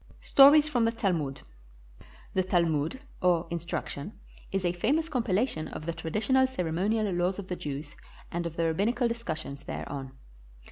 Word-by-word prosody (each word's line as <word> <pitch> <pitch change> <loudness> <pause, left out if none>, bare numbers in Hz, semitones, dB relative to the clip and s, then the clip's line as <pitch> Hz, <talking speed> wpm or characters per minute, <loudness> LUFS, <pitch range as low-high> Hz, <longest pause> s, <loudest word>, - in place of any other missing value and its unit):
STORIES 290 +2 +7
FROM 245 -6 +2
THE 230 - +2
TALMUD 170 - -1 0.9
[The 190 - +2
Talmud, 170 - +1 0.2
or 175 -2 +3
"instruction," 170 0 -4 0.4
is 195 -1 -1
a 175 - +2
famous 285 - +1
compilation 225 - 0
of 155 - -7
the 170 - -2
traditional 215 +11 +1
ceremonial 200 0 0
laws 175 +2 0
of 200 -2 -7
the 180 - -1
Jews 145 -2 -6 0.4
and 170 0 -2
of 165 - -8
the 165 - 0
rab 160 -1 0
binical 240 +4 +2
discussions 160 -12 -4
thereon. 135 -2 -6
180 Hz, 150 wpm, -29 LUFS, 160-230 Hz, 0.9 s, STORIES